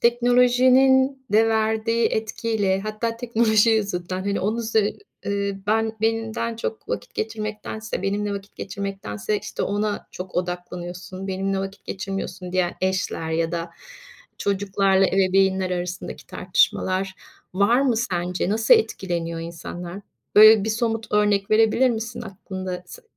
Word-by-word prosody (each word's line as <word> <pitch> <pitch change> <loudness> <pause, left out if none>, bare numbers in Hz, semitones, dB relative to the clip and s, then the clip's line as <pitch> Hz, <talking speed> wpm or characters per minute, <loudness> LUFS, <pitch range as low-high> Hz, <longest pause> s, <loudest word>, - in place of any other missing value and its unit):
teknolojinin 255 +2 +4
de 225 +1 +5
verdiği 220 +1 +1
etkiyle, 220 -3 -1
hatta 215 +2 -3
teknoloji 230 -2 +3
yüzünden, 185 -4 -1
hani, 200 -1 -1
onun 215 +5 -1
zü 220 -2 0 0.3
eee, 200 -1 -1
"Ben 220 +1 +1
benden 225 +1 -1
çok 225 -1 -5
vakit - - -4
geçirmektense 215 -1 -4
benimle 200 +1 -1
vakit 200 0 -9
geçirmektense, 195 - -3
işte, - - -5
ona 205 +1 -1
çok 185 0 -8
odaklanıyorsun. 180 +1 -5
Benimle 195 +1 -1
vakit 195 +1 -6
geçirmiyorsun." 190 -2 -5
diyen 185 -1 +1
eşler 185 -3 -1
ya 165 +1 0
da 170 0 -3 0.7
çocuklarla 195 -1 +2
ebeveynler 190 0 +2
arasındaki 180 0 -4
tartışmalar 185 +1 0 0.4
var 205 +6 +4
mı 260 -4 +2
sence? 180 -5 -1
Nasıl 220 +2 +5
etkileniyor 170 -6 -1
insanlar? 170 +2 -7 0.4
Böyle 215 -1 +9
bir 220 - 0
somut 225 0 -2
örnek 205 -1 +2
verebilir 225 +4 +4
misin 230 +1 -4
aklında? 190 -3 -6
Se - - -12
200 Hz, 125 wpm, -23 LUFS, 185-225 Hz, 0.7 s, Böyle